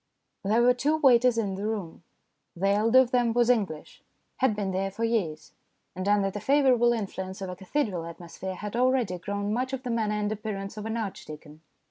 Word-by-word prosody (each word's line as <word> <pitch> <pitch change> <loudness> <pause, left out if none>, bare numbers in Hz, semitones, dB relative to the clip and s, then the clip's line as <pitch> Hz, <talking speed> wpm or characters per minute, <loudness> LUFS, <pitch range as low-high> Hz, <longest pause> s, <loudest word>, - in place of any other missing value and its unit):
There 220 +4 +3
were 250 +1 +6
two 290 +5 +1
waiters 250 -4 +4
in 205 -4 0
the 200 +2 -3
room. 200 -8 -4 0.5
The 195 +3 0
elder 220 +5 +3
of 260 -2 +5
them 240 -2 +2
was 240 +1 +4
English, 195 -10 -3 0.4
had 260 -5 +2
been 200 -2 -2
there 190 +1 -1
for 205 +4 -5
years, 195 -10 -1 0.4
and 185 +2 -4
under 200 -1 +2
the 205 - -5
favourable 260 -4 +4
influence 190 -4 -4
of 190 -2 -5
a - - -6
cathedral 190 - -2
atmosphere 170 +3 -7
had 205 +3 -6
already 245 -7 +1
grown 200 +2 -3
much 255 +3 -2
of 265 -1 -4
the 250 - -3
manner 220 -2 0
and 210 0 -1
appearance 205 -2 -5
of 215 0 -5
an 225 +1 -2
archdeacon. 155 -7 -7
210 Hz, 195 wpm, -27 LUFS, 190-240 Hz, 0.5 s, were